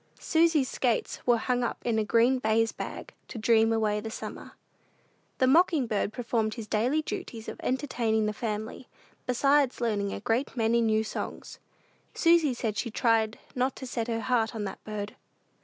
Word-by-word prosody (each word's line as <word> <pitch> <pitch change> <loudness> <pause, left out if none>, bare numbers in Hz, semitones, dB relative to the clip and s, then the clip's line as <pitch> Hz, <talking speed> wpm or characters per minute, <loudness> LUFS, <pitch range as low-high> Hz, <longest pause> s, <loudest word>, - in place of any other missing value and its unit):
Susy's 320 -4 +3
skates 245 -3 -1
were 240 -1 +5
hung 245 +2 0
up 240 - -2
in 230 -2 +1
a - - +2
green 235 +4 +3
baize 225 0 +2
bag, - - -7
to - - -8
dream 225 0 +3
away 215 -2 +1
the 220 +1 -6
summer. - - -8 0.8
The 260 - +3
mocking 315 0 +4
bird 210 -2 -1
performed 225 -2 -1
his 230 -3 -6
daily 245 +9 +1
duties 225 -6 -6
of - - -7
entertaining 240 -5 0
the 210 - -1
family, 220 +2 -4 0.4
besides 275 +1 +2
learning 210 -4 0
a - - -4
great 235 +6 -1
many 230 +1 +2
new 220 -1 +2
songs. 220 - -6 0.6
Susy 330 -6 +4
said 220 -3 -2
she 235 - -2
tried 225 0 +1 0.2
not 255 +1 0
to 265 - -7
set 240 -2 -3
her 230 -1 -2
heart 230 -2 0
on 215 - -3
that 200 - -6
bird. 210 -1 -5
230 Hz, 175 wpm, -28 LUFS, 220-255 Hz, 0.8 s, were